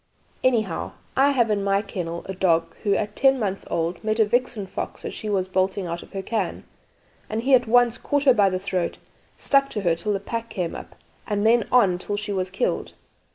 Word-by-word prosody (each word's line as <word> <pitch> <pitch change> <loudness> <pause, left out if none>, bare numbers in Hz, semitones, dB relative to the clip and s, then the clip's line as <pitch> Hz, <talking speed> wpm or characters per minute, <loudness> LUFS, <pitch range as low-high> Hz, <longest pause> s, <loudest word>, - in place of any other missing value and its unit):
"Anyhow, 220 -9 0 0.2
I 275 +2 +5
have 240 -6 +2
in 200 -1 0
my 200 +1 +1
kennel 170 -4 -5
a 190 - -5
dog 165 -3 +1
who, 200 -2 +2
at 210 +1 -2
ten 270 0 +4
months 195 -5 -3
old, 170 +3 -2
met 215 0 0
a 220 - +6
vixen 235 -2 0
fox - - -6
as - - -4
she 215 - -5
was 190 -2 0
bolting 190 +1 0
out 170 0 -4
of - - -15
her 195 -1 -4
cairn, 210 -4 -2 0.7
and 220 +2 -2
he 270 +2 +2
at 250 -2 +5
once 240 0 +4
caught 285 -1 0
her 265 -2 +6
by 205 -4 +4
the 185 - -1
throat, 185 -2 -2 0.4
stuck 275 -1 +3
to 210 - -3
her 175 -3 +2
till 185 +6 -2
the 195 - -1
pack 230 +3 -5
came 175 -3 -3
up, - - -9 0.3
and 205 -1 0
then 230 0 +4
on 195 -8 +4
till 205 +2 -3
she 205 0 -3
was 185 -1 -1
killed. - - -2
205 Hz, 220 wpm, -24 LUFS, 185-235 Hz, 0.7 s, a